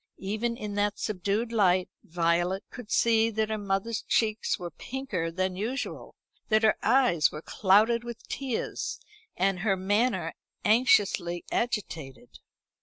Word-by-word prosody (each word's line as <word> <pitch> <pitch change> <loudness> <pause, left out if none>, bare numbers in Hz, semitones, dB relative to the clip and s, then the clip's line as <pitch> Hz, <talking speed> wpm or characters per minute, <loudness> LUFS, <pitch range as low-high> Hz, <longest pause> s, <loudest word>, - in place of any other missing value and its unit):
Even 220 +4 -2
in 210 -2 -5
that 205 0 0
subdued 210 +3 -1
light 185 -5 +3 0.2
Violet 175 +3 0
could 245 -4 -10
see 225 0 +3
that 220 0 -1
her 215 - 0
mother's 200 +3 -1
cheeks 215 -1 0
were 175 -1 -6
pinker 230 -11 -4
than 185 +1 -1
usual, 230 +8 -4 0.3
that 215 0 +3
her 215 - +5
eyes 245 - +3
were 150 +1 -8
clouded 215 +4 +3
with 235 -1 -9
tears, 265 -4 -3 0.4
and 190 0 +1
her 195 0 +1
manner 195 -2 +1 0.3
anxiously 205 -6 +3
agitated. 150 - -3
205 Hz, 130 wpm, -28 LUFS, 185-230 Hz, 0.4 s, her